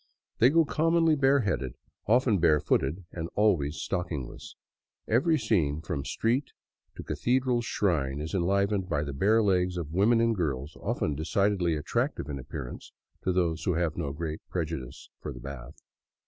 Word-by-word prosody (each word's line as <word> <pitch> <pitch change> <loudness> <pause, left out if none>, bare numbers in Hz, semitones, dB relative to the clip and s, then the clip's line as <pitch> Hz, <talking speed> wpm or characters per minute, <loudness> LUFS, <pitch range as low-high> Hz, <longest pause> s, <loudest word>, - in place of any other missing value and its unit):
They 125 - +7
go 165 +2 +4
commonly 165 +2 +3
bareheaded, 125 - +1 0.3
often 115 -2 +3
barefooted, 80 +1 +2
and 85 -1 -5
always 85 -9 +2
stockingless. 85 -9 -4 0.5
Every 150 +8 +3
scene 80 - +1
from 70 -4 -4
street 125 +5 0 0.4
to - - -7
Cathedral 125 -1 +1
shrine 75 - 0
is 75 +1 -5
enlivened 100 +1 +1
by 75 -3 0
the 70 -1 -5
bare 110 +10 +3
legs 90 -2 +1
of 80 -3 -5
women 110 +6 +4
and 115 0 +2
girls 75 -5 -2
often 75 - -1
decidedly 90 +3 +1
attractive 75 0 -2
in 70 -2 -4
appearance 65 -1 -7 0.2
— - - -43
to 95 - +3
those 85 -3 0
who 90 - +1
have 85 -2 0
no 80 -5 -3
great 80 +1 -4
prejudice 80 -7 -5
for - - -6
the 60 - -9
bath. 70 +2 -9
90 Hz, 155 wpm, -28 LUFS, 75-110 Hz, 0.5 s, They